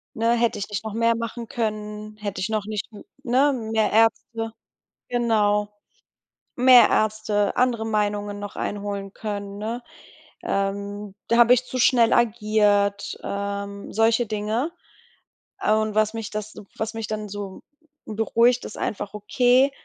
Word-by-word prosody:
Ne, 230 +1 +2
hätte 235 -1 +1
ich 200 - -4
nicht 205 -1 -3
noch 215 - -4
mehr 230 0 +2
machen 230 0 -5
können, 215 -2 -4
hätte 205 -2 -5
ich 210 - -1
noch 215 -2 -1
nicht 210 -1 -4 0.4
ne? 270 +4 +3 0.2
Mehr 220 -1 +2
Ärzte 225 +1 +1 0.6
genau, 210 -4 +2 0.9
mehr 250 -1 +7
Ärzte, 215 -1 +1
andere 240 -3 +2
Meinungen 205 -1 -1
noch 205 0 -7
einholen 200 -1 -4
können, 200 -2 -5
ne? 225 +4 -4 0.6
Ähm, 200 +1 -2
da 235 - +2
habe 240 +1 +7
ich 250 0 +1
zu 255 - -5
schnell 240 -2 +4
agiert, 210 -3 +2
ähm, 200 0 -4
solche 225 +2 +3
Dinge. 215 +8 -2 0.9
Und 215 0 +2
was 215 0 +2
mich 225 -2 -5
das 215 0 -5 0.2
was 220 +1 -3
mich 225 -1 -4
dann 215 -1 -4
so 200 -1 -7 0.4
beruhigt, 230 +3 +2
ist - - -8
einfach, 200 -1 -3
okay, 245 +6 +3
215 Hz, 140 wpm, -24 LUFS, 205-230 Hz, 0.9 s, mehr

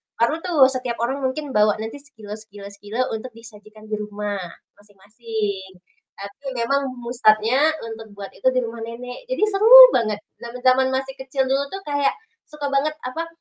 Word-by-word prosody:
baru 300 +8 +1
tuh 330 -6 +3
setiap 255 -2 -3
orang 265 +4 -1
mungkin 275 +2 -3
bawa 210 -1 +3
nanti 225 +6 -6
sekilo 225 -8 -12
sekilo 205 -2 -12
sekilo 205 +4 -5
untuk 225 +2 -6
disajikan 215 -1 -14
di 210 - -2
rumah 205 -1 -4 0.4
masing-masing. 205 -1 -6 0.4
Tapi 200 +8 -11
memang 275 +4 0
mu 240 -1 -8
start-nya 235 +4 +3 0.2
untuk 225 -1 -8
buat 200 -1 -8
itu - - -1
di 255 - +1
rumah 230 0 -7
nenek 245 - -9
jadi - - -1
seru 410 +2 +1 0.3
banget. 215 -3 0 0.2
Zaman-zaman 255 +2 +1
masih 270 0 -2
kecil 265 0 -1
dulu 275 +1 +1
tuh 390 - -5
kayak 285 -1 +1 0.3
suka 295 -1 -5
banget 300 +3 0
apa, 320 +7 -4
235 Hz, 165 wpm, -22 LUFS, 215-275 Hz, 0.4 s, tuh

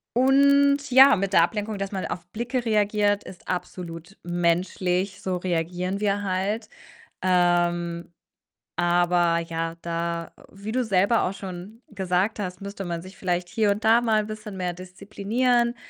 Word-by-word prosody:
Und 280 +2 +4
ja, 265 -1 +8
mit 195 0 -2
der 170 - +6
Ablenkung, 210 +2 -2
dass 195 0 -4
man 190 -2 -3
auf 175 - -6
Blicke 240 +5 -3
reagiert, 210 -1 +2
ist 180 - -12
absolut 180 0 -6
menschlich, 180 +2 0
so 185 -1 -2
reagieren 180 +2 -2
wir 205 -1 0
halt. 200 +4 -2 0.5
Ähm, 175 -1 +1 0.6
aber 175 -1 +2
ja, 165 0 -4
da 170 0 -3 0.2
wie 200 +3 -7
du 255 0 +1
selber 205 +1 +2
auch 185 - -1
schon 195 +4 -9
gesagt 190 +1 -1
hast, 180 -2 -5
müsste 200 0 -6
man 170 -1 -3
sich 185 +1 -12
vielleicht 180 -1 -1
hier 220 -2 +1
und 205 +2 -3
da 225 +2 +5
mal 220 -2 +2
'n 210 - -8
bisschen 215 -2 -7
mehr 180 -1 -2
disziplinieren 215 +7 -1
190 Hz, 150 wpm, -25 LUFS, 175-215 Hz, 0.6 s, ja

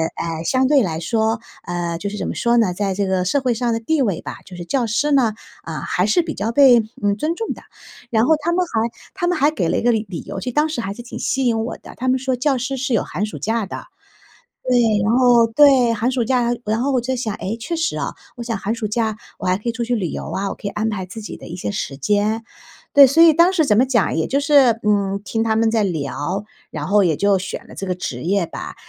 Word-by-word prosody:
哎， 165 -1 -4
相 260 +8 +2
对 285 -2 +4
来 165 -5 -2
说 220 +4 0 0.3
嗯， 175 -1 -3
就 200 - -3
是 210 - -6
怎 - - -3
么 - - -3
说 235 0 +2
呢， 210 -6 +2
在 195 0 -1
这 200 +1 -1
个 185 -1 +1
社 280 +10 +2
会 250 -2 +1
上 235 +1 -1
的 225 - -1
地 290 +6 0
位 200 -9 0
吧， - - -7
就 180 - -11
是 175 - -7
教 260 +4 0
师 290 +7 0
呢， 245 -6 +3 0.3
嗯， 160 - -4
还 180 - 0
是 215 +12 +3
比 325 -1 -5
较 220 +3 -2
被， 260 -2 +6 0.2
嗯， 200 0 +1
尊 315 +8 -1
重 450 +4 -3
的。 - - -14 0.5
然 225 0 +2
后 315 - +4
他 340 +3 0
们 360 +1 +1
还 230 -6 -1 0.2
他 360 -2 -2
们 360 - +1
还 290 +3 +3
给 180 - -1
了 - - +1
一 - - 0
个 240 - +4
理 220 -1 0
理 170 - -5
由， - - -6
就 250 +5 -4
当 300 +5 +2
时 295 -7 -3
还 195 -2 -4
是 240 - -9
挺 240 - -8
吸 265 -1 0
引 225 -2 +1
我 - - -5
的， - - -13
他 255 - -3
们 255 +1 +3
说 260 0 -1
教 265 +2 +1
师 255 +2 -3
是 265 -1 -2
有 220 - +2
寒 205 - -3
暑 215 - -7
假 225 -1 -1
的。 - - -8 0.8
对， 250 -1 +2 0.3
然 210 - +2
后 245 -2 +5
对， 255 -1 +5
寒 230 +3 0
暑 250 -2 0
假。 240 0 +1
然 220 +1 0
后 280 - 0
我 255 -3 +1
就 260 +2 -2
想， 225 -4 -3
诶， 215 +3 -4
确 335 +9 -4
实 330 +1 -1
啊， - - -3 0.2
我 235 - -5
想 230 -1 -3
寒 210 +4 -2
暑 220 -3 -3
假 220 0 -1 0.2
我 - - -4
还 185 +1 +2
可 210 - -19
以 235 - +2
出 235 +1 -4
去 240 +1 0
旅 190 -6 -1
游 - - -6
啊， 195 +1 -2
我 - - -4
可 - - -7
以 - - -1
安 220 +1 -1
排 190 -3 -4
自 220 +4 -8
己 210 - -8
的 - - -11
一 170 - -7
些 105 - -4
时 135 - -4
间。 210 +9 0 0.5
对， 280 -1 +9
所 325 +6 +5
以 325 -2 +7
当 340 +4 +5
时 320 -5 +2
怎 210 - +3
么 250 - +5
讲， 235 -9 +1
也 160 - 0
就 275 - +1
是， 275 -6 +4
嗯， 200 -1 +1
听 225 - -2
他 220 -1 +1
们 225 0 +2
在 220 -2 +2
聊， 170 +2 -3 0.3
然 150 -1 -5
后 205 +1 +4
也 165 -5 +2
就 200 +1 +2
选 190 - -6
了 - - -13
这 195 - -5
个 180 - -1
职 130 -9 -5
业 185 +1 +1
吧。 - - -8
225 Hz, 295 characters per minute, -20 LUFS, 200-260 Hz, 0.8 s, 对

